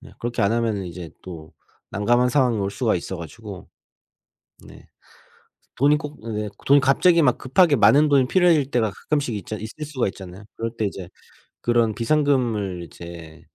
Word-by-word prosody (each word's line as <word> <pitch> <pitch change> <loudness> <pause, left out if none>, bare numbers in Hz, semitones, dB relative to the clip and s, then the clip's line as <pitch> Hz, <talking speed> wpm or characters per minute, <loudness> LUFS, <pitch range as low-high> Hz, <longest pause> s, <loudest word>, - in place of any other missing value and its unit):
네. 125 - -14
그렇게 120 0 -3
안 100 +3 +2
하면은 115 -4 -1
이제 85 -1 -8
또 80 -4 -10 0.4
난감한 120 +5 +2
상황이 125 -4 +2
올 100 0 -1
수가 115 +1 0
있어 90 +2 -4
가지고. 95 +4 -10 1.0
네. - - -15 0.9
돈이 145 +3 +3
꼭 150 0 -8 0.2
네 105 0 -3 0.2
돈이 140 +1 +6
갑자기 165 +6 +4
막 125 -5 +3
급하게 145 +4 +3
많은 145 +6 +5
돈이 135 -3 +4
필요해질 165 -6 +3
때가 115 -3 +1
가끔씩 140 -1 -2
있잖 105 +2 -6
있을 110 +8 -7
수가 135 -7 -2
있잖아요. 95 +1 -9
그럴 115 0 -4
때 110 - -1
이제 95 -3 -5 0.5
그런 120 -2 +2
비상금을 115 - 0
이제 85 0 -11
115 Hz, 330 characters per minute, -22 LUFS, 100-140 Hz, 1.0 s, 돈이